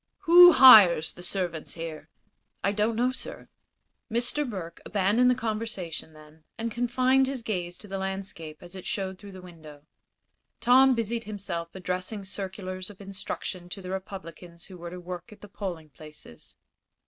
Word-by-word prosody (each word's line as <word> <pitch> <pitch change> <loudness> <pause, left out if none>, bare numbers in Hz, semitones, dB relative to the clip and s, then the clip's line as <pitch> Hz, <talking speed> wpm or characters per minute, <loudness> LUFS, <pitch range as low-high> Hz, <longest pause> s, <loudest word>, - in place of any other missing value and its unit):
"Who 350 +1 +9
hires 205 - +8
the - - -12
servants 175 -3 -4
here?" 165 -2 -7 0.5
"I 200 - +2
don't 215 +2 0
know, 245 +3 +1
sir." 260 - -9 0.6
Mr. 245 +5 0
Burke 170 -6 -7
abandoned 210 +5 +2
the 250 - +3
conversation, 215 -9 -4
then, 155 +1 -17
and 230 0 -3
confined 255 +3 +2
his 265 -3 -4
gaze 180 -5 -3
to 210 - -12
the 195 0 -4
landscape 190 -5 -6
as 175 +1 -12
it 190 -1 -9
showed 190 -2 -3
through 200 -2 -12
the 185 -1 -11
window. 155 -5 -13 0.8
Tom 260 +2 +5
busied 230 0 -2
himself 185 -5 -6
addressing 185 +2 -4
circulars 185 -1 -6
of 205 - -14
instruction 190 -2 -6
to 195 - -7
the 185 -1 -7
Republicans 180 -3 -8
who 185 - -12
were 170 0 -7
to 180 +1 -8
work 180 +1 -8
at 210 - -15
the 205 - -11
polling 175 -6 -7
places. 150 - -13
190 Hz, 160 wpm, -27 LUFS, 175-225 Hz, 0.8 s, Who